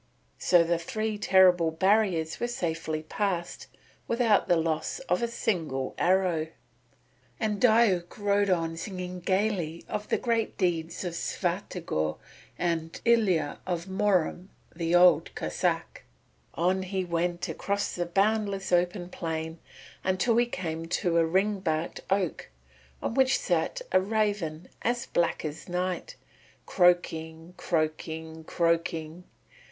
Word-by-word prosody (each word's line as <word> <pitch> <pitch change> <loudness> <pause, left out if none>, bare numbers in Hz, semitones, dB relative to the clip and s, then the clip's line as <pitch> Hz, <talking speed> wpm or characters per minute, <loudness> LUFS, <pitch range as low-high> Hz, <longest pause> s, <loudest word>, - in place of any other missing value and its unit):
So 175 -2 +5
the 170 0 0
three 215 +5 -3
terrible 180 -4 +5
barriers 180 -1 +1
were 240 - 0
safely 165 -8 -3
passed 175 +1 -3 0.4
without 230 -3 +3
the 175 - +4
loss 160 -1 -1
of - - 0
a 235 - +1
single 165 - -2
arrow, 180 -3 +2 0.9
and 215 -3 -1
Diuk 220 -7 +3
rode 205 -1 +2
onward 165 -2 0
singing 180 -2 -5
gaily 185 -3 -1
of 210 0 -4
the - - +2
great 230 -2 -1
deeds 170 -3 -1
of 175 -2 -3
Svyatogor 170 - -2 0.4
and 165 -2 -2
Ilya 205 -11 +2
of 175 -2 -2
Murom 190 -2 +1 0.3
the 165 0 0
Old 180 0 +5
Cossáck. - - -2 0.5
On 185 +3 +1
he 190 0 -2
went 175 +1 -1
across 200 +5 -2
the 175 -1 -2
boundless 200 +1 0
open 175 +1 +1
plain 160 -2 -4 0.4
until 190 +5 +2
he 240 0 +3
came 165 -7 -4
to 170 0 +1
a 165 - +4
ring 195 +4 +1
barked 160 -3 -2
oak 190 -3 -1 0.5
on - - -1
which 265 +1 +4
sat - - -1
a - - +5
raven 200 -6 -1
as 240 +1 0
black 170 -1 0
as 155 +3 -6
night, 185 - -2 0.5
croaking, 165 -2 +1
croaking, 160 0 -3
croaking. 165 0 -1
180 Hz, 125 wpm, -28 LUFS, 165-200 Hz, 0.9 s, So